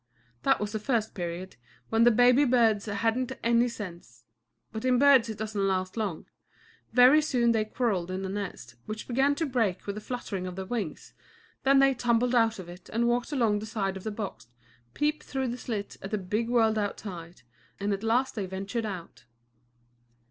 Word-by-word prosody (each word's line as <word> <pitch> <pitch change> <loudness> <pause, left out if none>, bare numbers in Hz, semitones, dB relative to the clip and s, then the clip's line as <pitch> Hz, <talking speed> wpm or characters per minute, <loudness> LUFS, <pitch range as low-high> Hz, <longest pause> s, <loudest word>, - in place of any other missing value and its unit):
That - - +3
was 210 0 -3
the 215 - -2
first 225 -1 -1
period, 175 - -5 0.3
when 225 +1 +4
the - - +8
baby 245 +4 +5
birds 230 -6 +3
hadn't 225 +4 0
any 235 +1 +3
sense. 175 - -9 0.5
But 220 - -5
in 255 -1 +3
birds 265 -4 +6
it 220 - -5
doesn't 210 -2 -1
last 185 -1 -1
long. 205 -8 -3 0.7
Very 255 +5 +7
soon 245 -6 +2
they 220 -2 +1
quarrelled 215 -6 -1
in 185 +1 -3
the - - -2
nest, 190 - -5
which 215 0 -6
began 270 +3 +2
to 325 - -1
break 230 - 0
with 200 - -3
the 210 - -7
fluttering 205 -6 -4
of 180 - -6
their 190 0 -5
wings, 205 -7 -5 0.5
then 275 +1 +4
they 275 0 +5
tumbled 240 0 +1
out 225 -2 +3
of 185 -3 -8
it 175 +2 -12
and 235 +2 +1
walked 240 +4 0
along 230 -7 +2
the 215 - -7
side 195 -3 -2
of 190 - -8
the 220 - -2
box, 195 - -6 0.5
peeped 300 +1 0
through 265 -2 -3
the 240 - -3
slit 210 -5 -5
at 195 - -6
the 215 - -1
big 210 +5 -2
world 225 -3 +3
outside, 180 - -6 0.4
and 200 +1 0
at 195 - -3
last 240 +4 +1
they 200 -4 -3
ventured 195 +5 -3
out. 185 -5 -8
220 Hz, 190 wpm, -28 LUFS, 195-245 Hz, 0.7 s, the